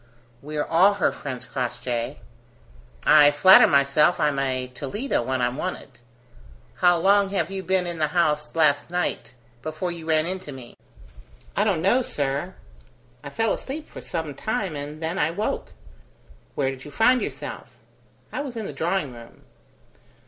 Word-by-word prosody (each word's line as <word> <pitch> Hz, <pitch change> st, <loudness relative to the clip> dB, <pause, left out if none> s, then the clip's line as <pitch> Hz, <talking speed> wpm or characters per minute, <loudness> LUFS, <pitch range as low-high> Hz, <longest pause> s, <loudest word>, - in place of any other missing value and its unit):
"We're 150 Hz, +1 st, -3 dB
all 190 Hz, +5 st, +4 dB
her 200 Hz, -, +1 dB
friends, 130 Hz, -3 st, -7 dB
Crossjay. 120 Hz, -2 st, -3 dB, 0.9 s
I 150 Hz, -1 st, +7 dB
flatter 165 Hz, +6 st, +7 dB
myself 140 Hz, +4 st, +3 dB
I'm 150 Hz, -3 st, +1 dB
a 130 Hz, -2 st, -1 dB
Toledo 140 Hz, -, -3 dB
when 130 Hz, +1 st, -1 dB
I'm 125 Hz, +2 st, -1 dB
wanted. 185 Hz, -5 st, -6 dB, 0.8 s
How 175 Hz, -1 st, +4 dB
long 200 Hz, +3 st, +3 dB
had 195 Hz, -1 st, -1 dB
you 195 Hz, -1 st, -3 dB
been 185 Hz, 0 st, 0 dB
in 175 Hz, -2 st, -4 dB
the 155 Hz, -, +2 dB
house 150 Hz, -2 st, 0 dB
last 145 Hz, -2 st, +2 dB
night 175 Hz, -7 st, -3 dB, 0.3 s
before 155 Hz, +3 st, -4 dB
you 165 Hz, -2 st, -8 dB
ran 155 Hz, 0 st, +3 dB
into 185 Hz, -3 st, -4 dB
me?" 130 Hz, -3 st, -10 dB, 0.8 s
"I 205 Hz, -, +2 dB
don't 190 Hz, -6 st, 0 dB
know, 240 Hz, +7 st, +4 dB
sir; 145 Hz, -, -2 dB, 0.7 s
I -, -, -6 dB
fell 225 Hz, +9 st, 0 dB
asleep 300 Hz, +3 st, -6 dB
for -, -, -9 dB
some 160 Hz, -4 st, -4 dB
time, 195 Hz, -, -3 dB
and 145 Hz, +2 st, -7 dB
then 165 Hz, +4 st, -2 dB
I -, -, +2 dB
woke!.. 200 Hz, +6 st, -3 dB, 0.4 s
." 60 Hz, 0 st, -29 dB
"Where 135 Hz, -2 st, 0 dB
did 135 Hz, 0 st, -10 dB
you -, -, -9 dB
find 245 Hz, -, +3 dB
yourself?" -, -, -6 dB, 0.6 s
"I -, -, -2 dB
was 265 Hz, -5 st, -6 dB
in 220 Hz, -, -4 dB
the -, -, -6 dB
drawing 165 Hz, -2 st, -1 dB
room." 115 Hz, -1 st, -14 dB
155 Hz, 165 wpm, -24 LUFS, 140-190 Hz, 0.9 s, I